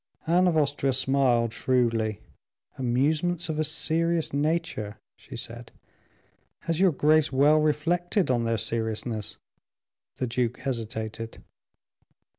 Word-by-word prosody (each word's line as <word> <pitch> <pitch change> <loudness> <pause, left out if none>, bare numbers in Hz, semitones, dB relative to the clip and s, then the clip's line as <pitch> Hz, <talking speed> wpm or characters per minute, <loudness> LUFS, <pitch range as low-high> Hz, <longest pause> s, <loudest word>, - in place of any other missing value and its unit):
Anne 180 +3 +3
of 165 -3 +2
Austria 140 -2 +1
smiled 130 -3 +2
shrewdly. 115 -5 0 0.5
"Amusements 155 +8 0
of 155 -1 -2
a - - +2
serious 165 +1 0
nature?" 150 -8 -1 0.2
she - - -12
said. - - -8 0.9
"Has 165 0 -2
your 190 -1 +5
Grace 155 +1 +3
well 145 +3 +4
reflected 165 +3 +1
on 120 -2 +1
their 115 0 0
seriousness?" 110 0 -2 0.8
The 130 - -2
duke 120 0 -1
hesitated. 115 -3 -5
140 Hz, 110 wpm, -26 LUFS, 115-160 Hz, 0.9 s, your